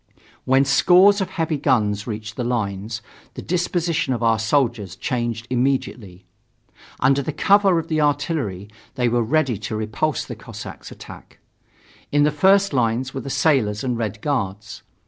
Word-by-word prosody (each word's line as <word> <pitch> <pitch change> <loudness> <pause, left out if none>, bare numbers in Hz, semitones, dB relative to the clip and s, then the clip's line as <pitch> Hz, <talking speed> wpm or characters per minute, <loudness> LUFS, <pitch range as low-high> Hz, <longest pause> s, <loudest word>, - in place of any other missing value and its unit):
When 135 +1 +3
scores 185 +8 +5
of 190 - -2
heavy 160 -5 -2
guns 105 -6 +1
reached 105 -1 -6
the 125 - -3
lines, 110 -2 -3 0.3
the - - -6
disposition 170 -5 -1
of 120 - -4
our 115 -1 +3
soldiers 110 - 0
changed 120 0 -3
immediately. 120 -7 -2 0.8
Under 135 +1 +3
cover 195 +2 +3
of 165 0 -2
the 155 -2 0
artillery 145 - -1 0.3
they 125 -2 +1
were 120 0 +1
ready 125 -2 0
to - - -5
repulse 110 +8 -2
the - - -7
Cossacks' - - -10
attack. - - -12 0.7
In 145 0 +3
the 150 - +3
first 190 +5 +3
lines 125 +1 0
were 135 - -4
the 135 - -7
sailors 135 -7 +1
and 125 -2 -1
Red 110 -2 -4
Guards. 105 -8 -3
130 Hz, 150 wpm, -21 LUFS, 110-150 Hz, 0.8 s, scores